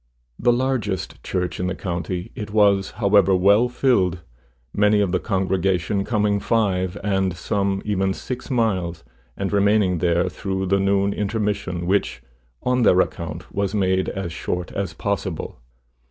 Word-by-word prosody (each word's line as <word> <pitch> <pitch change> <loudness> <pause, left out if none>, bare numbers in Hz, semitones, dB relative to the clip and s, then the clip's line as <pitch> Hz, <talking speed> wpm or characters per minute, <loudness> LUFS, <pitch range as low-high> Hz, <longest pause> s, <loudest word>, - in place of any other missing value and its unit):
The 120 - +4
largest 120 -7 -1
church 90 -1 -2
in 90 - -1
the 90 - -2
county, 90 0 -4
it 105 -1 -6
was, 100 -2 +3
however, 100 -3 +4
well 100 +6 +4
filled, 95 -10 +1 0.5
many 105 0 +3
of 100 -3 +1
the 90 - +1
congregation 95 -1 0
coming 105 -3 +1
five 95 -5 0
and 95 -3 0
some 100 +2 -1
even 95 -2 0
six 125 +2 -6
miles, 95 -9 0 0.3
and 100 +1 -2
remaining 100 -3 +3
there 85 +1 +2
through 95 +3 -3
the 100 +1 +2
noon 100 +1 +2
intermission, 100 -4 -2
which, 95 -9 0 0.4
on 125 0 +1
their 95 -5 +5
account, 85 -1 -3
was 100 0 -1
made 95 -2 +1
as 95 -4 -4
short 90 +1 -3
as 100 -1 -4
possible. 100 - -3
95 Hz, 145 wpm, -22 LUFS, 90-105 Hz, 0.5 s, their